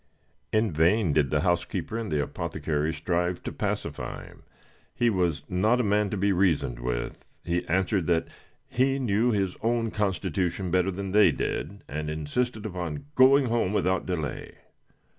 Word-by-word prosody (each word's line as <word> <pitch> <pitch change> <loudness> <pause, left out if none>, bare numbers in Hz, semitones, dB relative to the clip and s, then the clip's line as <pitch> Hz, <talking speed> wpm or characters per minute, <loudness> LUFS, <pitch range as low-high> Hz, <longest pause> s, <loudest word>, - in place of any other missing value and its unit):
In 110 -1 +2
vain 85 +3 +3
did 70 -2 +2
the 75 -1 +1
housekeeper 85 +5 -1
and 115 -6 -3
the 75 -2 +1
apothecary 75 +2 -2
strive 85 +2 -1
to - - -4
pacify - - -4
him - - -15 0.5
he 120 -1 +2
was 85 -7 0
not 105 +7 +2
a - - +2
man 105 0 +2
to 105 - -3
be 100 +1 +2
reasoned 85 -10 +1
with; - - -3 0.2
he 85 +1 0
answered 95 0 +1
that 85 -2 +2 0.4
he 135 +2 +1
knew 120 -2 +1
his 100 -5 0
own 115 0 0
constitution 95 -2 -1
better 90 +1 +2
than 95 +1 -4
they 105 -3 +6
did, 100 +6 -4
and 75 +2 -4
insisted 105 +10 -2
upon 90 -7 -4
going 135 +1 +6
home 115 -5 0
without 95 -3 +1
delay. 80 -6 -4
95 Hz, 160 wpm, -27 LUFS, 80-105 Hz, 0.5 s, they